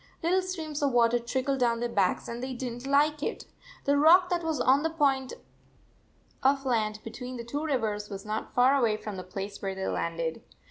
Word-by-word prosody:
Little 365 +3 +3
streams 320 -5 -5
of 280 -3 +1
water 240 0 +4
trickled 260 +3 -1
down 235 -2 +2
their 240 - -1
backs, 200 -6 0
and 235 +1 -5
they 260 0 -4
did 245 -1 -4
n 240 - -8
t 270 +3 -7
like 295 +1 +3
it. - - -3 0.4
The 285 0 +3
rock 355 +4 +6
that 345 -1 0
was 320 -2 -1
on 265 +2 +4
the 325 - 0
point 275 -5 +1 1.1
of 275 +1 +2
land 220 -4 +1
78 215 - -13
between 250 +3 -7
the 235 - -5
two 285 +6 -4
rivers 220 -8 -1
was 195 -1 -7
not 215 +1 -4
far 255 +3 +5
away 230 -6 +2
from 210 -1 -6
the 185 - -5
place 195 +2 -6
where 195 -1 -3
they 190 0 -4
landed. 165 -1 -2
250 Hz, 220 wpm, -28 LUFS, 215-285 Hz, 1.1 s, rock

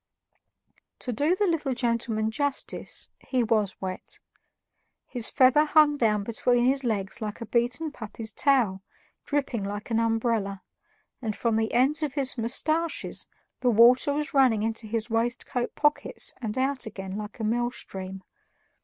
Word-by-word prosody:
To 250 - -4
do 295 +10 +2
the 410 - +1
little 305 -7 0
gentleman 230 -3 0
justice, 285 +3 -1
he 255 -2 0
WAS 215 -4 0
wet. 185 -1 -4 0.9
His 245 -3 -3
feather 260 +2 +5
hung 305 -1 +5
down 215 -6 +1
between 240 +2 +1
his 270 +1 +2
legs 215 0 -2
like 210 -1 -4
a 230 - -5
beaten 245 +7 0
puppy's 220 -3 -6
tail, 230 -7 +2 0.4
dripping 275 -7 -1
like 205 +3 -5
an 225 - +2
umbrella, 225 -4 0 0.6
and 220 -4 -2
from 230 -2 0
the 220 0 0
ends 275 +6 +3
of 300 -2 -2
his 275 -3 +3
mustaches 310 +8 -1 0.3
the 250 - +2
water 240 +5 +6
was 295 0 -2
running 255 -6 +4
into 225 0 -2
his 225 +1 -2
waistcoat 240 +2 -1
pockets 295 0 0
and 220 0 -4
out 265 -2 0
again 195 -2 -6
like 210 +3 -7
a - - -3
mill 240 +2 +1
stream. 190 -5 -7
235 Hz, 150 wpm, -27 LUFS, 220-270 Hz, 0.9 s, water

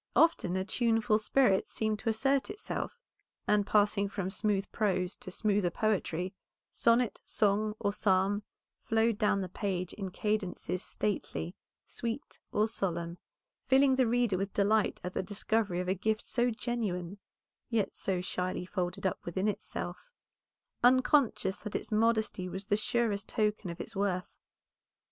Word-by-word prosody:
Often 325 - +4
a 190 0 0
tuneful 225 0 +2
spirit 215 -3 +3
seemed 215 -1 -1
to 225 - -1
assert 270 +7 +1
itself, 420 +3 -4 0.5
and 210 -1 +3
passing 205 -1 +3
from 195 -2 -3
smooth 200 0 0
prose 185 -4 0
to - - -8
smoother 200 -1 +1
poetry, 185 -2 -1 0.4
sonnet, 235 -1 +2
song, 210 0 +1
or 205 -2 -1
psalm, 200 0 +2 0.4
flowed 225 -1 +1
down 205 -2 +2
the 185 - -3
page 185 -1 -3
in 195 -2 -5
cadences 195 -2 -2
stately, 185 -5 -3 0.3
sweet, 235 +4 -5
or 210 +1 +2
solemn, 170 -5 -1 0.5
filling 265 0 +5
the 260 -2 +3
reader 235 -5 +2
with 195 0 -2
delight 210 +1 +2
at 180 +1 -4
the - - 0
discovery 205 -1 0
of 180 - -2
a 185 - +3
gift 215 +3 -1
so 245 0 +1
genuine, 210 -6 -3 0.5
yet 220 -5 0
so 185 -2 -1
shyly 180 0 -2
folded 180 -1 -3
up 190 - 0
within 185 +4 -1
itself, 355 - -4 0.7
unconscious 250 -5 +4
that 210 - -6
its - - -3
modesty 220 -4 +1
was 190 +2 -5
the 205 - +2
surest 215 -1 0
token 210 -3 0
of 170 - -6
its 225 - -6
worth. 195 -2 -1
205 Hz, 145 wpm, -31 LUFS, 190-225 Hz, 0.7 s, filling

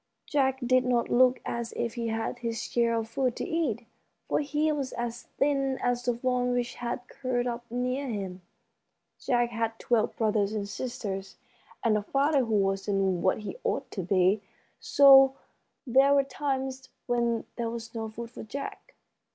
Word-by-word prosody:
Jack 265 -2 +1
did 255 +1 +4
not 245 -2 +1
look 255 +1 +5
as 235 -1 -3
if 235 -1 -2
he 235 -1 -3
had 225 +2 -2
his 230 -1 -3
share 235 -1 +1
of 225 -1 -2
food 250 +1 -1
to - - -4
eat, 320 - -1 0.4
for - - +1
he 300 +1 +1
was 280 -3 -3
as 240 0 -4
thin 275 -2 +1
as 245 0 0
the 245 -1 0
fawn 250 0 0
which 245 0 -1
had 245 +1 -5
curled 250 -2 -2
up 240 -1 -4
near 250 +3 -2
him. 195 -5 -4 0.8
Jack 240 -1 +1
had 225 -1 -2
twelve 230 -2 +1
brothers 215 -2 +1
and 205 -2 -2
sisters, 205 -5 -5 0.5
and 225 -2 +3
a 210 - +1
father 275 +5 +2
who 225 -1 0
wasn't 195 -2 +1
what 190 +3 +1
he 210 - -6
ought - - -2
to 195 - -3
be, 185 +3 +2 0.4
so 270 -1 +7 0.5
there 270 +3 +5
were 280 - +4
times 265 -2 -3 0.2
when 235 -2 0
there 235 -1 -1
was 230 0 -7
no 225 -1 -4
food 230 +1 -8
for - - -9
Jack. 275 +6 -7
240 Hz, 170 wpm, -28 LUFS, 225-260 Hz, 0.8 s, so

